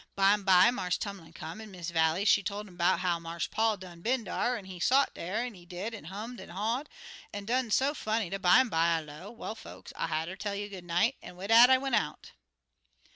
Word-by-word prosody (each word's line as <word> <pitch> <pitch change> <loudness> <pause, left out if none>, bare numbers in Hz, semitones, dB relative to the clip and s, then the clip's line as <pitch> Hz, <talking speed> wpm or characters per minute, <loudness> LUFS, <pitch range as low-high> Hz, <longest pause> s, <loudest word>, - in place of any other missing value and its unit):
Bimeby, 195 0 +5
Marse 180 -7 -1
Tumlin 195 -6 -7
come, 165 +5 -8
an' 220 - -10
Miss 180 -3 -6
Vallie, 165 +3 +2
she 205 - +5
tol' 200 +1 -4
'm 200 -4 -13
'bout 175 0 +2
how 175 -2 0
Marse 165 0 -4
Paul 220 -1 +1
done 175 -2 -11
been 245 +4 0
dar; 245 +2 -1
an' 200 - -10
he 185 -2 -9
sot 265 +10 +3
dar, 210 +8 -3
he 205 -8 -9
did, 180 +6 -6
an' 210 - -9
hummed 215 +7 -7
an' - - -11
haw'd, 225 - -2 0.4
an' 205 0 -6
done 245 +2 0
so 270 +6 +2
funny 220 -6 -1
dat, 195 +3 -5
bimeby, 225 +7 +5
I 165 0 +3
low, 155 +6 -10
'Well, 230 -1 -6
folks, 225 - -12
I'll - - -2
hatter 160 +3 -2
tell 200 0 -4
you 205 +1 -4
good 190 -3 -9
night,' 180 +9 +1
an' - - -11
wid 190 +3 -7
dat 235 +2 +9
I 260 - +7
went 270 +1 -4
out." - - -1
200 Hz, 225 wpm, -30 LUFS, 175-225 Hz, 0.4 s, dat